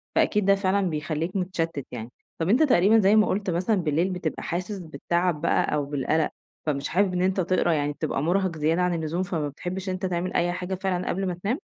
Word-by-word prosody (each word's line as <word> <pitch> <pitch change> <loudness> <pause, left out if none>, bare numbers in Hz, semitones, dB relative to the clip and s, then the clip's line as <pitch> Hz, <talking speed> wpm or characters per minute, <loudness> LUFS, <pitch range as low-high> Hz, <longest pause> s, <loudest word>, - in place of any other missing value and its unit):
فأكيد 210 -2 +2
ده 200 0 +5
فعلًا 195 -1 +1
بيخلّيك 155 +4 -3
متشتّت 165 -6 -2
يعني. 115 -1 -6 0.3
طب 165 +3 0
أنت 255 +9 +5
تقريبًا 220 - +5
زي 200 +1 +5
ما 215 - +5
قُلت 195 -1 -1
مثلًا 180 +6 +1
بالليل 170 0 +1
بتبقى 180 -4 -3
حاسس 185 +4 -3
بالتعب 170 -1 -1
بقى 170 - +1
أو 145 -1 0
بالقلق، 145 +2 0 0.4
فمش 145 -2 -1
حابب 185 +1 +2
إن 180 - 0
أنت 190 +1 +1
تقرا، 180 -1 +2
يعني 145 -1 0
بتبقى 150 -2 -2
مُرهق 180 -1 +1
زيادة 160 +4 +1
عن 180 -1 +2
اللزوم، 165 +2 -1
فما 160 -5 -2
بتحبش 185 +6 -5
إن 185 - -1
أنت 185 +1 -3
تعمل 180 0 -2
أي 175 0 +2
حاجة 180 +2 -3
فعلًا 185 -1 -2
قبل 195 +1 -1
ما 180 - -1
تنام؟ 245 - 0
180 Hz, 215 wpm, -25 LUFS, 160-190 Hz, 0.4 s, ده